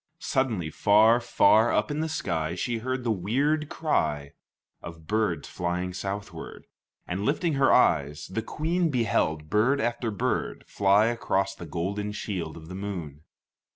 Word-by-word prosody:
Suddenly, 120 - -1
far, 110 +6 +5
far 110 0 +4
up - - +1
in 145 - -2
the 160 +1 -1
sky, 85 - -2
she 115 +5 -2
heard 130 +2 -3
the 120 - 0
weird 140 - 0
cry 75 - -1 0.5
of 85 -1 -10
birds 105 -5 -1
flying 90 +1 -3
southward, 100 +3 -6 0.4
and 95 +3 -3
lifting 160 - 0
her 135 -1 +3
eyes, 75 - +3
the 115 +5 -3
Queen 165 +8 -1
beheld 90 - 0
bird 115 +7 +3
after 120 -1 -1
bird 100 -3 -2
fly 100 +2 +3
across 100 -4 0
the 85 -3 -10
golden 100 +6 -3
shield 90 -7 -4
of 80 -1 -11
the 90 - -8
moon. 90 -7 -6
105 Hz, 150 wpm, -27 LUFS, 85-120 Hz, 0.5 s, far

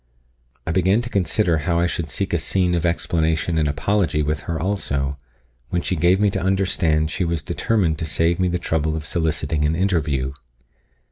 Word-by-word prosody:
I - - -1
began 95 +6 +2
to 120 - -7
consider 90 -3 +1
how 85 +3 0
I 85 - +2
should 85 -2 -2
seek - - -2
a - - +2
scene 90 -2 +1
of 85 0 +1
explanation 80 -1 0
and 75 - +2
apology 80 +1 0
with 75 0 -1
her 80 -1 -1
also, 70 -7 -1 0.5
when 85 -1 -1
she 95 - -1
gave 90 +3 +3
me 105 -1 +3
to 95 - -2
understand 90 -5 +1
she 90 - -1
was 85 -2 -1
determined 90 -8 0
to 80 - -3
save 85 +3 +1
me 90 - +2
the 90 0 0
trouble 80 -2 -1
of 80 -2 -5
soliciting 80 -1 -1
an 75 +2 +1
interview. 75 -8 0
85 Hz, 190 wpm, -21 LUFS, 75-95 Hz, 0.5 s, gave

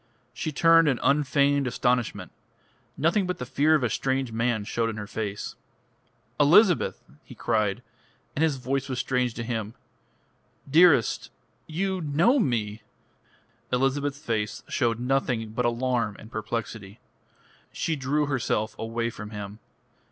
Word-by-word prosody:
She 155 - -3
turned 165 +2 +5
in 130 -4 +1
unfeigned 140 -1 +2
astonishment. 125 -1 -1 0.7
Nothing 175 +5 +2
but 180 - -2
the 125 - -5
fear 150 +5 +3
of 150 - +1
a 120 - +1
strange 130 -2 -1
man 115 -1 0
showed 115 +2 -1
in 110 - -5
her 105 - -5
face. 105 -1 -4 0.9
"Elizabeth," 175 - +4 0.2
he - - -13
cried, 110 +2 0 0.5
and 145 - -1
his 160 -3 +3
voice 135 +1 -2
was 130 - -3
strange 125 -1 0
to 115 - -4
him: 115 -1 -4 0.9
"dearest 150 -5 +4 0.4
you 190 +3 -2
know 170 - +3
me?" 110 - -1 0.9
Elizabeth's 135 +2 0
face 110 -7 -3
showed 115 -3 0
nothing 125 -3 0
but 125 +2 -1
alarm 120 -2 0
and 110 - -13
perplexity. 110 -1 -5 0.7
She 165 - -2
drew 145 +2 0
herself 120 -6 -1
away 115 +1 -2
from 105 -2 -8
him. 105 0 -7
125 Hz, 135 wpm, -26 LUFS, 115-145 Hz, 0.9 s, turned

